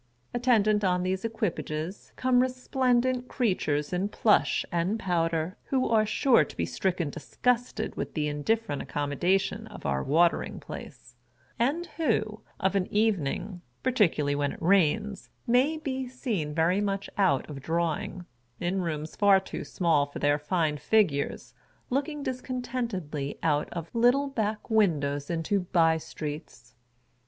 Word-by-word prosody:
Attendant 215 -4 +3
on 180 -1 +2
these 185 +1 -1
equipages 190 -6 -3
come 255 -1 +3
resplendent 255 0 +1
creatures 180 - 0
in 190 +3 0
plush 210 0 +2
and 175 +5 0
powder, 165 -2 0
who 260 -1 +1
are 215 -2 +3
sure 260 +3 +4
to - - -11
be - - 0
stricken 180 -5 -1
dis 165 - -11
gusted 245 -3 +1
with - - -5
the 150 -2 0
indifferent 150 +3 -1
accommodation 145 +7 0
of - - -11
our 70 -1 0
Watering 170 +4 +2
Place, - - -10 0.5
and 290 +9 +1
who, 215 -9 0 0.2
of 190 +1 +1
an 190 -2 +1
evening 195 -3 0 0.2
(particularly 180 - +2
when 145 0 0
it - - -11
rains), 195 +3 +2 0.2
may 260 +7 +3
be 265 -4 -3
seen 215 - -3
very 170 +5 +2
much 200 -1 -1
out 165 -10 +2
of 140 -3 -7
drawing, 170 +3 -2 0.3
in 185 +2 -1
rooms 155 -2 -4
far 200 -2 +5
too 190 - -6
small 160 -5 +1
for 145 - -9
their 145 +1 +2
fine 150 0 0
figures, 150 -2 +1 0.4
looking 285 +2 -1
discontentedly 240 - -3
out 150 -2 +1
of 170 -1 -6
little 245 +4 +4
back 220 -6 -2
windows 145 -10 +1
into 170 +4 0
bye 165 -3 +3
streets. 150 -6 -7
190 Hz, 140 wpm, -28 LUFS, 155-235 Hz, 0.5 s, far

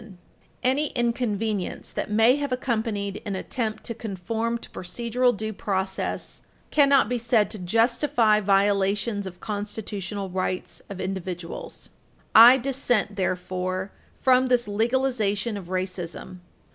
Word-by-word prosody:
[Footnote 220 -3 -13
3/16] - - -21 0.5
Any 270 +4 +2
inconvenience 225 -5 -2
that - - -3
may 225 +4 +5
have 285 -2 -3
accompanied 220 -5 -2
an 205 -3 -3
attempt 220 +2 -3
to 230 - -4
conform 225 +2 -3
to - - -12
procedural 235 +5 0
due 220 +1 -4
process 190 -1 -3 0.3
cannot 280 -5 +5
be 245 +1 -1
said 230 -2 +2
to 215 - -6
justify 230 +3 +2
violations 200 +1 +1
of 180 -1 -10
constitutional 205 -2 -4
rights 185 0 -3
of 195 -2 -7
individuals. 185 -2 -5 0.4
I 240 +4 +10
dissent, 245 -5 0
therefore, 185 0 -2 0.3
from 255 0 +4
this 245 -2 +2
legalization 225 -1 0
of 195 -4 -7
racism. 185 0 -4
215 Hz, 125 wpm, -25 LUFS, 190-240 Hz, 0.5 s, I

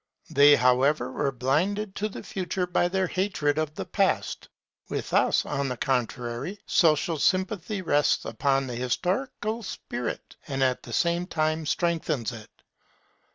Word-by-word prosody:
They 145 +1 +7
however 125 +1 +3
were 140 +1 -1
blinded 175 - 0
to 215 +2 -1
the - - -8
Future 185 -1 -2
by 175 0 +1
their 190 +1 0
hatred 175 -6 0
of 155 -1 -2
the - - -4
Past. - - 0 0.4
With - - -4
us, - - +3
on 140 -1 -1
the 125 -2 -3
contrary, 125 - -2
social 165 -3 +2
sympathy 190 +2 0
rests 150 -3 +2
upon 135 -1 +1
the 125 - -5
historical 200 - -2
spirit, 125 - -5
and 135 -2 0
at 130 -1 +1
the - - -11
same 170 +1 +1
time 155 -2 -1
strengthens 160 -8 0
it. 110 -3 -10
155 Hz, 145 wpm, -26 LUFS, 135-185 Hz, 0.4 s, They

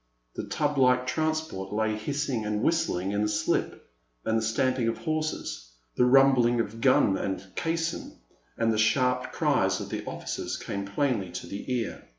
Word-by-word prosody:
The - - -5
tub 145 -2 0
like 125 -1 +4
transport 155 -11 -2
lay 110 +1 0
hissing 130 +1 -2
and 105 +1 -1
whistling 100 - +1
in 100 0 0
the 105 - +1
slip, 105 0 -1 0.4
and 110 - +1
the 115 - +2
stamping 120 +2 +1
of 115 - 0
horses, 155 - -3 0.3
the 125 - +4
rumbling 125 -2 +5
of 115 0 -3
gun 115 -7 +4
and 95 -1 -3
caisson, 165 0 -2 0.4
and 115 -1 +2
the 110 - 0
sharp 125 +3 +2
cries - - +1
of - - -6
the - - -4
officers - - -4
came 100 0 -4
plainly 100 -2 0
to - - -5
the 100 +6 -6
ear. 120 -3 -2
120 Hz, 165 wpm, -27 LUFS, 105-135 Hz, 0.4 s, rumbling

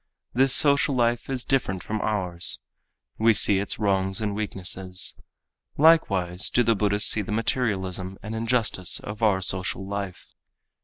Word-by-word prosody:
This 135 +2 +2
social 140 0 +4
life 120 0 0
is 130 -2 -2
different 95 -9 -1
from 110 0 -4
ours. 90 -5 +2 0.6
We 110 0 +4
see 100 -2 +4
its 100 - -3
wrongs 95 -1 0
and 105 -2 -2
weaknesses. 95 -3 -3 0.6
Likewise 100 - +3
do 120 - +2
the 115 0 +2
Buddhists 105 0 +2
see 110 - 0
the 105 - -7
materialism 95 -5 -2
and 105 +1 -6
injustice 115 -5 -2
of 105 +2 -9
our 100 -4 +2
social 95 +1 -2
life. 100 -2 -6
105 Hz, 145 wpm, -24 LUFS, 95-115 Hz, 0.6 s, social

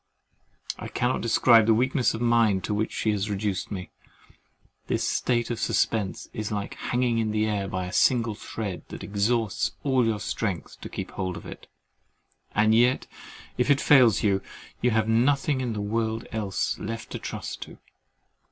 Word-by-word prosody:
I - - -5
cannot 125 +1 -1
describe 115 -1 +5
the 110 - +5
weakness 130 +1 +2
of 110 - -5
mind 115 -5 +3
to 105 - -2
which 110 +1 -1
she 110 - 0
has 105 0 -1
reduced 100 -2 -2
me. 95 -3 -6 1.0
This - - 0
state 120 -1 0
of 115 - -3
suspense 105 -5 0
is 110 -1 -4
like 100 -1 -3
hanging 120 -2 0
in 110 -1 0
the 110 0 +1
air 105 -2 -1
by 95 -1 -3
a 90 - -7
single 115 -3 +3
thread 105 -2 -5
that - - -8
exhausts 105 +1 0
all 130 -3 +3
your 110 -2 0
strength 100 -3 -4
to - - -7
keep - - -6
hold 95 -1 -3
of - - -10
it; - - -10 0.9
and 110 +1 +4
yet 120 +3 +3 0.5
if 125 - +2
that 140 -1 +4
fails 125 -9 +5
you, 100 -2 +2 0.4
you 125 - +3
have 110 -1 +1
nothing 130 +4 +2
in 120 -3 -2
the 105 - -3
world 110 +2 -1
else 105 -4 -2
left 115 +1 -6
to - - -4
trust - - -6
to. - - -9
110 Hz, 175 wpm, -26 LUFS, 105-120 Hz, 1.0 s, describe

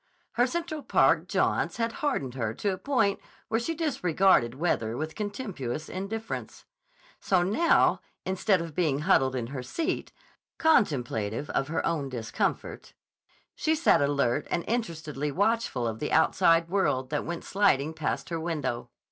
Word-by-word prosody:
Her 245 +2 +2
Central 330 +1 -3
Park - - +3
jaunts - - 0
had 230 -1 0
hardened 205 - -1
her 115 -4 -3
to 200 -2 -1
a - - -5
point 245 -8 +1 0.3
where 225 +1 +1
she 325 +8 -2
disregarded 185 - +2
weather 120 -7 -1
with 155 +2 -4
contemptuous 200 - -4
indifference. 220 +4 -5 0.5
So 185 -2 +2
now, 220 - +3 0.2
instead 190 0 +1
of 165 -2 -6
being 150 -4 +1
huddled 135 -7 +3
in 120 -2 -2
her 130 - -3
seat, 315 - -3 0.5
contemplative 130 - +1
of 135 - 0
her 160 +1 -1
own 150 -5 -1
discomfort, 115 -3 -3 0.6
she 315 0 +1
sat 320 - +4
alert 140 -4 +1
and 170 - -1
interestedly 160 - -2
watchful 200 - 0
of 110 -1 -4
the 150 - -3
outside 165 0 +4
world 145 -9 0
that 150 - 0
went 170 -1 -5
sliding 160 -7 +2
past 155 -2 -3
her 165 -1 -2
window. 135 -8 -3
165 Hz, 150 wpm, -28 LUFS, 135-210 Hz, 0.6 s, sat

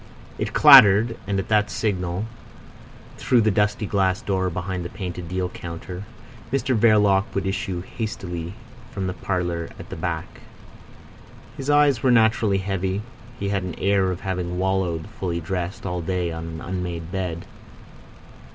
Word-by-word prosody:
It - - -2
clattered; 115 -6 +8
and 100 -1 0
at 95 - -4
that 105 -1 +3
signal, 90 -2 -2 0.9
through 125 -2 +3
the 110 0 +3
dusty 105 +1 +1
glass 95 -2 +1
door 95 -2 0
behind 90 +1 -4
the 85 - -5
painted 90 -3 -6
deal 90 0 -1
counter, 90 +2 -7 0.5
Mr 135 -1 +1
Verloc 105 -3 +4
would 100 - -1
issue 95 -2 -2
hastily 90 -5 -5 0.3
from 95 - -4
the 90 - -2
parlour 90 -2 -2
at - - -10
the - - -4
back. - - -4 1.2
His 135 +1 -5
eyes 145 -4 +4
were 130 - +3
naturally 110 -3 +4
heavy; 95 +1 -2 0.4
he 100 - -2
had 100 -1 0
an 90 -1 -5
air 100 -1 +2
of 90 0 -4
having 90 -2 -3
wallowed, 90 -3 0
fully 85 -3 -1
dressed, 90 +2 -4
all 90 -2 -2
day 90 0 -1
on 80 0 -5
an 80 -1 -7
unmade 90 -2 -4
bed. 90 -3 -3
95 Hz, 150 wpm, -23 LUFS, 90-105 Hz, 1.2 s, clattered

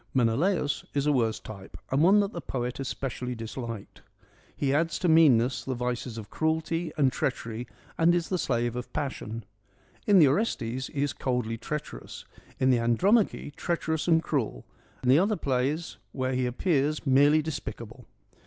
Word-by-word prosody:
Menelaus 145 - +1
is 140 0 +1
a 150 - +3
worse 115 -4 +1
type 100 -3 -10
and 135 +2 +2
one 195 +5 +6
that 200 +1 -2
the 170 - -5
poet 125 -2 -4
especially 125 -2 -4
disliked. 115 -2 -7 0.6
He 140 -1 +1
adds 165 +3 +1
to 180 - -1
meanness 135 -7 +5
the 130 - -3
vices 125 -1 -3
of 110 -1 -8
cruelty 160 +1 -1
and 135 -3 +3
treach 135 -4 -2
ery 115 +1 -5 0.3
and 170 +1 +5
is 170 -2 0
the 185 - 0
slave 120 -3 0
of 125 0 -6
passion. 115 -5 -4 0.6
In 205 -2 +6
the 160 -5 +8
Orestes 130 - -1
he 140 -2 -2
is 145 -3 -1
coldly 120 -3 -2
treacherous, 135 - -6 0.3
in 130 0 +4
the 125 - +3
Andromache 165 - +2
treacherous 160 -2 -2
and 165 -1 +4
cruel, 115 - -2 0.4
in 125 - +1
the 135 +4 +7
other 205 +4 +2
plays 140 +3 -1 0.2
where 130 0 -1
he 125 0 0
appears 150 +3 0
merely 145 +3 +5
despicable. 125 -6 -7
135 Hz, 165 wpm, -28 LUFS, 120-160 Hz, 0.6 s, the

